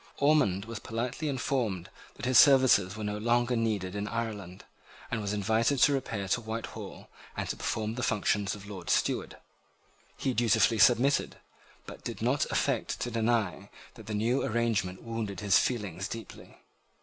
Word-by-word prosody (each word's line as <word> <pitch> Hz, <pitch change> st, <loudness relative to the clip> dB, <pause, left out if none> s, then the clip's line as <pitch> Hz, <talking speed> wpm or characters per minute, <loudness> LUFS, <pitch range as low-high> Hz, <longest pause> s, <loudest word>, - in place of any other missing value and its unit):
Ormond 140 Hz, -10 st, +2 dB
was 115 Hz, -1 st, -6 dB
politely 125 Hz, +8 st, -3 dB
informed 125 Hz, -9 st, -2 dB, 0.2 s
that -, -, -6 dB
his 130 Hz, 0 st, +6 dB
services 130 Hz, -9 st, +5 dB
were 110 Hz, -, -6 dB
no 105 Hz, 0 st, -3 dB
longer 120 Hz, +2 st, +1 dB
needed 105 Hz, -5 st, -1 dB
in 100 Hz, +1 st, -3 dB
Ireland, 105 Hz, -6 st, -5 dB, 0.5 s
and 115 Hz, -2 st, -1 dB
was 100 Hz, -1 st, -2 dB
invited 110 Hz, +6 st, +1 dB
to 140 Hz, +3 st, +5 dB
repair 110 Hz, -7 st, -3 dB
to 120 Hz, -, +1 dB
Whitehall, 110 Hz, 0 st, -7 dB, 0.3 s
and -, -, -2 dB
to -, -, -2 dB
perform 110 Hz, 0 st, -2 dB
the 125 Hz, -, -4 dB
functions 105 Hz, -3 st, 0 dB
of 100 Hz, -1 st, -11 dB
Lord 95 Hz, -4 st, -8 dB
Steward. -, -, 0 dB, 0.8 s
He 130 Hz, -, -1 dB
dutifully 115 Hz, -1 st, +3 dB
submitted, 125 Hz, +7 st, +4 dB, 0.5 s
but -, -, -11 dB
did -, -, -5 dB
not -, -, +1 dB
affect -, -, -1 dB
to 120 Hz, -, -2 dB
deny 110 Hz, -4 st, 0 dB, 0.2 s
that 110 Hz, -3 st, -13 dB
the 110 Hz, -, -3 dB
new 115 Hz, +5 st, +1 dB
arrangement 110 Hz, -7 st, -1 dB
wounded 115 Hz, -5 st, -4 dB
his 100 Hz, -2 st, +4 dB
feelings 100 Hz, -7 st, -2 dB
deeply. 115 Hz, -1 st, -9 dB
110 Hz, 160 wpm, -29 LUFS, 100-120 Hz, 0.8 s, his